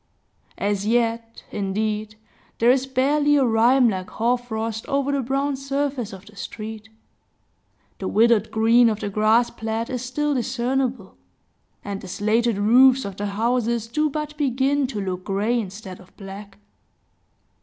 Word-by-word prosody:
As 200 0 -1
yet, 230 0 0
indeed, 210 +2 -2 0.4
there 235 +2 +5
is 265 0 +1
barely 290 +3 +2
a 275 -2 +4
rime 240 +3 +4
like 185 -4 -2
hoarfrost 225 -2 -2
over 280 0 0
the 280 -1 0
brown 275 +3 -1
surface 275 -3 -2
of 190 0 -11
the 210 -1 -16
street; 220 +1 -7 1.1
the 190 - -3
withered 225 0 +3
green 230 +2 +4
of 215 -1 -2
the 205 - -4
grass 220 +4 +3
plat 225 +2 -4
is 250 -2 -3
still 295 +4 -1
discernible; 250 -3 -2 0.7
and 200 -1 -4
the - - -9
slated 215 +4 +1
roofs 255 +5 +5
of 200 -1 -6
the 205 - -2
houses 230 +2 0
do 300 +7 0
but 300 +1 -4
begin 275 0 +1
to 235 -5 -5
look 185 -2 -4
gray, 210 +5 0
instead 195 -2 -7
of 185 - -19
black. 195 0 -10
230 Hz, 145 wpm, -23 LUFS, 210-260 Hz, 1.1 s, there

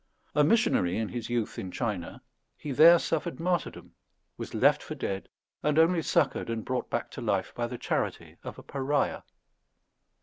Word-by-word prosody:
A 150 - +4
missionary 215 - +2
in 110 -1 -2
his 120 -2 -5
youth 120 -3 -2
in 95 - -5
China, 100 -4 -4 0.3
he 150 - -6
there 165 +6 +8
suffered 165 0 -2
martyrdom, 175 -2 -2 0.4
was - - -7
left - - +4
for - - -7
dead, 95 0 -4 0.3
and 150 0 +1
only 165 +1 +4
succoured 145 - +1
and 115 -1 -3
brought 130 -1 -2
back 120 - -3
to - - -7
life 100 -4 -1
by 120 0 -2
the 125 +1 -6
charity - - -3
of - - -7
a - - -11
pariah. 140 +1 -1
130 Hz, 170 wpm, -28 LUFS, 110-160 Hz, 0.4 s, there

